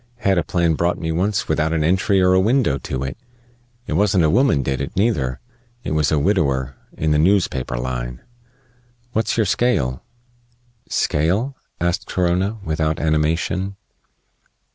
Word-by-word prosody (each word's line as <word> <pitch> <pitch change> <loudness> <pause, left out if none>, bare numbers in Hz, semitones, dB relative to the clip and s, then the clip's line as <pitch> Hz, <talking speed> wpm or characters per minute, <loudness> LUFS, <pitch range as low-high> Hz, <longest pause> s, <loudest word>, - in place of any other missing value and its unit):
"Had 100 -6 +2
a - - 0
plan 85 0 +1
brought 85 +3 0
me 80 -2 -3
once 95 +5 0
without 80 0 +1
an 80 -2 +1
entry 95 +4 +2
or 90 0 +4
a 95 - +5
window 110 - +2
to 65 0 -4
it. 65 - -5 0.7
It - - -4
wasn't 95 -3 +3
a 75 - +3
woman 105 - +3
did 65 0 -2
it, 70 - -5
neither. 75 - 0 0.4
It - - -4
was 75 -3 +1
a 80 - +3
widower, 70 -7 +1 0.2
in 80 0 0
the 75 - +3
noospaper 80 -9 +1
line. - - -4 0.9
What's 110 +1 0
your 110 - +3
scale?" 95 - 0 0.9
"Scale?" 95 - 0 0.2
asked 85 +2 -1
Corona, 90 +4 0
without 80 -1 -1
animation. 80 +5 0
85 Hz, 150 wpm, -20 LUFS, 75-95 Hz, 0.9 s, a